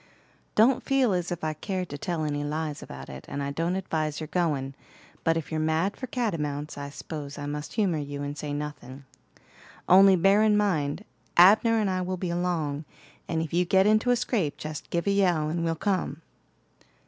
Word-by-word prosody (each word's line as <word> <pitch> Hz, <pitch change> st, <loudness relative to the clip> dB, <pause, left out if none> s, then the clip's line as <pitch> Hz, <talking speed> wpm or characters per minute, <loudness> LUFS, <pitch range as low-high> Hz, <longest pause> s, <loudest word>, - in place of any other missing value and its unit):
"Don't 235 Hz, +4 st, +5 dB
feel 270 Hz, -6 st, +2 dB
as 175 Hz, -1 st, -1 dB
if 175 Hz, -, -4 dB
I 155 Hz, 0 st, 0 dB
cared 185 Hz, +3 st, -4 dB
to 145 Hz, -, -5 dB
tell 170 Hz, -1 st, -2 dB
any 145 Hz, -1 st, -2 dB
lies 150 Hz, 0 st, -3 dB
about 65 Hz, 0 st, -9 dB
it, 65 Hz, +1 st, -9 dB
and 140 Hz, -, -4 dB
I 140 Hz, -, -2 dB
don't 165 Hz, +5 st, -1 dB
advise 155 Hz, -5 st, -2 dB
your 155 Hz, -1 st, -6 dB
goin'; 145 Hz, -7 st, 0 dB, 0.5 s
but 165 Hz, 0 st, +2 dB
if 165 Hz, -, -5 dB
you're 160 Hz, -, -1 dB
mad 160 Hz, +5 st, +1 dB
for 255 Hz, -, -6 dB
catamounts, 155 Hz, -, -2 dB
I 140 Hz, 0 st, -6 dB
s'pose 145 Hz, -1 st, -7 dB
I 145 Hz, -, -5 dB
must 150 Hz, +1 st, -5 dB
humor 190 Hz, -8 st, +1 dB
you 145 Hz, 0 st, -5 dB
and 145 Hz, 0 st, -4 dB
say 150 Hz, 0 st, -5 dB
nothing. 145 Hz, -2 st, -6 dB, 0.8 s
Only 190 Hz, +1 st, +7 dB
bear 195 Hz, +4 st, +4 dB
in 215 Hz, -1 st, +4 dB
mind, 180 Hz, -3 st, 0 dB, 0.3 s
Abner 215 Hz, +6 st, +7 dB
and 215 Hz, -2 st, +1 dB
I 185 Hz, -1 st, 0 dB
will 185 Hz, +1 st, -2 dB
be 180 Hz, -1 st, -3 dB
along, 165 Hz, -4 st, -1 dB, 0.4 s
and 160 Hz, -1 st, -1 dB
if 160 Hz, -, -7 dB
you 175 Hz, +1 st, +3 dB
get 190 Hz, +2 st, +3 dB
into 215 Hz, +3 st, +3 dB
a 245 Hz, -, +5 dB
scrape 225 Hz, -, -1 dB
jest 155 Hz, 0 st, -7 dB
give 170 Hz, 0 st, -1 dB
a 200 Hz, -, +2 dB
yell 175 Hz, -6 st, +2 dB
and 165 Hz, +1 st, -2 dB
we'll 165 Hz, -1 st, 0 dB
come." 165 Hz, -4 st, -2 dB
165 Hz, 200 wpm, -27 LUFS, 150-190 Hz, 0.8 s, Only